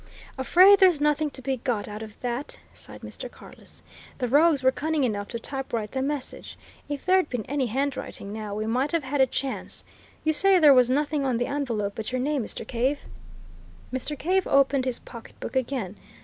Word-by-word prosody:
"Afraid 370 +9 +6
there's 365 -6 +5
nothing 300 +1 +1
to 265 -2 -8
be 265 0 -1
got 230 -4 -2
out 210 +1 -7
of 215 -1 -10
that!" 245 +3 -3 0.2
sighed - - -12
Mr. - - -8
Carless. - - -14 0.3
"The 250 - -1
rogues 290 +2 +4
were 260 - +5
cunning 310 +2 -1
enough 205 -4 -1
to 235 - -5
typewrite 235 -4 -4
the 265 - -2
message 280 -1 -4 0.3
if 290 -1 -5
there'd 370 -3 +3
been 245 -4 -3
any 275 -2 -1
handwriting, 260 -5 -3
now, 215 -2 -5
we 215 +1 -2
might 255 +7 0
have 335 -3 +1
had 270 +1 0
a 265 - +5
chance! 265 +1 -4 0.4
You 315 - +2
say 390 +4 +6
there 300 -5 +7
was 250 -2 +5
nothing 290 +2 0
on 260 -3 0
the 245 - 0
envelope 235 -8 -2
but 220 +2 -5
your 255 - -1
name, 280 0 0
Mr. 220 - -6
Cave?" 260 +4 0 0.9
Mr. 275 +3 -3
Cave 370 +6 +1
opened 275 -1 +3
his 255 -2 -1
pocketbook 235 +2 -10
again. 250 -7 -2
265 Hz, 190 wpm, -26 LUFS, 235-295 Hz, 0.9 s, there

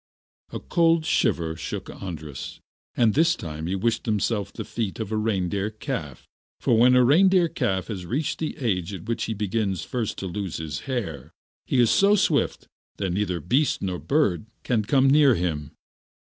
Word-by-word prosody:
A - - -4
cold 165 -2 +2
shiver 80 - +1
shook 80 - -5
Andras, 80 -7 -7 0.4
and 115 -3 +4
this 165 +3 +3
time 80 - -6
he 95 - -1
wished 115 +4 -1
himself 105 -1 0
the - - -7
feet 110 -4 -4
of 110 -2 -4
a - - 0
reindeer 100 -2 -1
calf. 110 0 -6 0.3
For 120 - +2
when 125 +3 +5
a 125 - +6
reindeer 180 +5 +5
calf 95 - -1
has 95 -6 -6
reached 140 - -2
the 160 0 -3
age 100 - -1
at - - -9
which 115 0 -2
he 110 - -3
begins 105 -2 -1
first 120 -4 -3
to - - -5
lose 95 -1 -4
his 75 -4 -4
hair 90 - -3 0.4
he 130 - +1
is 120 -2 +5
so 200 +1 +5
swift 170 -7 +1 0.3
that 95 -3 -2
neither 90 -2 -1
beast 130 - +1
nor 90 -2 -2
bird 125 - +1 0.2
can 115 -4 +1
come 135 +4 +3
near 140 -2 +5
him. 80 -5 -2
110 Hz, 175 wpm, -25 LUFS, 90-130 Hz, 0.4 s, a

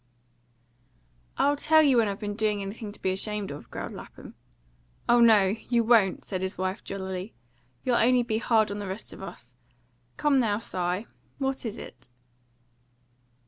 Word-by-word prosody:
"I'll 285 +1 +3
tell 315 +2 +5
you 275 -4 +4
when 225 -2 +4
I've 200 -1 -3
been 205 -1 -3
doing 210 -2 0
anything 205 +2 -6
to - - -12
be 190 - +2
ashamed 205 -1 -2
of," 145 - -9
growled - - -6
Lapham. - - -11 0.7
"Oh 240 0 +5
no, 220 -5 +6 0.2
you 235 -1 +3
won't!" 220 -5 +3
said 185 -2 -3
his 190 0 -3
wife 185 +2 -2
jollily. 190 0 -5 0.5
"You'll 245 -2 +2
only 245 +1 +4
be 220 -2 -1
hard 220 -3 +2
on 205 - -4
the 205 - -5
rest 190 +3 -4
of - - -11
us. - - -10 0.6
Come 290 -2 +3
now, 215 -4 +2
Si; 185 -2 -2 0.3
what 270 -3 -2
is 220 +1 -6
it?" 130 - -11
215 Hz, 165 wpm, -27 LUFS, 195-240 Hz, 0.7 s, no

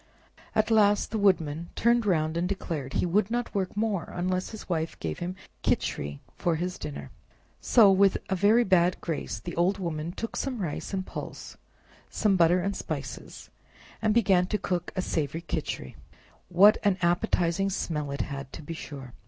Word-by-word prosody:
At 215 +1 +2
last 205 -2 +4
the 220 - -1
Woodman 170 -5 +1
turned 235 -1 +3
round 160 -3 +1
and 175 +2 0
declared 155 -9 -4
he - - +1
would 190 +4 +2
not 240 +1 -2
work 195 0 -2
more 210 -5 -1
unless 185 +1 -1
his 220 - -9
Wife 165 -2 -2
gave - - -4
him 180 +1 -4 0.3
Khichri 70 0 -1 0.2
for 170 -2 0
his 180 +3 -3
dinner; 70 -3 -7 0.5
so 215 -5 +6
with 195 0 +4
a 190 - 0
very 210 +6 +4
bad 180 -3 +3
grace 160 -8 -3
the - - -7
old 180 +4 +2
woman 165 -3 -3
took 230 +5 -5
some 265 -2 -2
rice 175 -8 -4
and 190 -1 -2
pulse, - - -7 0.5
some 205 -3 +2
butter 175 0 +4
and 195 +2 -2
spices, - - -6 0.5
and 215 - +2
began 190 -5 +4
to 210 - 0
cook 180 -3 -2
a 185 - -1
savory 155 0 -2
Khichri. - - -4 0.5
What 195 +4 +6
an 200 -2 +2
appetizing 175 +2 +1
smell 150 -6 -2
it 140 0 -2
had, 135 -2 -6
to - - -8
be 165 - -6
sure! 135 -6 -8
180 Hz, 175 wpm, -27 LUFS, 165-200 Hz, 0.5 s, so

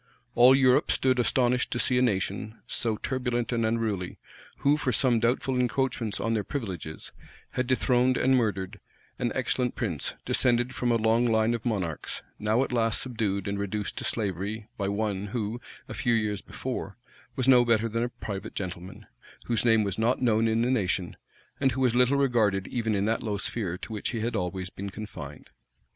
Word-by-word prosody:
All 125 +3 +7
Europe 130 -1 +4
stood 130 -1 +2
astonished 125 0 +2
to - - -2
see 125 +1 +3
a - - +2
nation, 105 -1 -1
so 110 -2 -1
turbulent 125 -2 -2
and 115 -1 0
unruly, 110 -5 -1 0.4
who, 140 +1 +3
for 135 -4 -1
some 120 0 +3
doubtful 125 +2 +1
encroachments 125 -4 0
on 115 +1 0
their 105 -2 0
privileges, 95 - -5 0.4
had 125 -1 -1
dethroned 125 0 +2
and 130 +1 +3
murdered 100 -4 -1 0.4
an - - 0
excellent 125 -1 0
prince, 85 - -3
descended 120 0 +2
from 125 -1 0
a - - +4
long 115 +2 +3
line 110 0 +2
of 115 -2 -3
monarchs, 90 -9 -3 0.2
now 110 +4 +2
at - - -4
last 115 -2 +2
subdued 105 -6 -1
and 100 0 -2
reduced 100 0 -3
to - - -5
slavery 105 +1 -2
by 100 -4 -2
one 100 -1 -1
who, 110 +2 -3 0.3
a - - -7
few 120 -2 +1
years 105 -3 -1
before, - - -5 0.4
was 130 - -1
no 125 -2 +7
better 115 -1 +2
than 115 +1 -2
a 120 - 0
private 100 -4 -6
gentleman, 90 -1 -6 0.4
whose 115 -2 0
name 115 -2 +4
was 100 0 -2
not 115 +3 +2
known 115 -2 +3
in 110 +1 +2
the 125 - +1
nation, 95 -6 0 0.4
and 135 -3 +2
who 130 - -2
was 125 -3 +3
little 125 +3 +4
regarded 110 -8 +2
even 115 -3 -1
in 100 0 +1
that 115 +1 0
low 105 -3 -2
sphere 100 -4 -3
to 110 - -8
which 105 - -3
he 115 -3 -3
had 115 +1 -2
always 90 -1 -3
been 100 +1 -6
confined. 105 +2 -9
115 Hz, 185 wpm, -27 LUFS, 100-125 Hz, 0.4 s, All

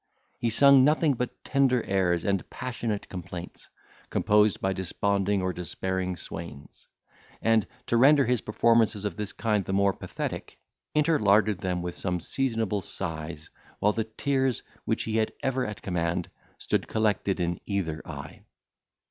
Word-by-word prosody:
He 120 - +1
sung 140 +3 +7
nothing 150 +1 +4
but 125 0 -4
tender 130 -3 +2
airs 90 -3 +1
and 100 -2 0
passionate 120 -4 -4
complaints, 90 -1 -8 0.4
composed 105 -1 +3
by 95 0 0
desponding 100 +1 0
or 90 0 0
despairing 95 +1 -3
swains; 80 -5 -9 0.5
and, 115 -1 +2 0.2
to 120 - +1
render 140 +3 +6
his 125 -1 +1
performances 110 -1 +2
of 100 -5 -2
this 105 0 -3
kind 105 -3 0
the 95 - -4
more 100 0 +3
pathetic, - - -5 0.4
interlarded 110 - +3
them 90 -1 -2
with 90 0 -4
some 90 -2 -1
seasonable 110 0 -1
sighs, 80 -4 -5 0.3
while 105 +1 +2
the 110 - -1
tears, 130 +2 0 0.2
which - - 0
he 110 0 -1
had 110 -1 +1
ever 130 -2 0
at 105 -1 -7
command, 85 -2 -1 0.3
stood - - -1
collected 105 -3 0
in 85 0 -1
either 85 -6 -2
eye. 70 0 -9
105 Hz, 145 wpm, -27 LUFS, 90-115 Hz, 0.5 s, sung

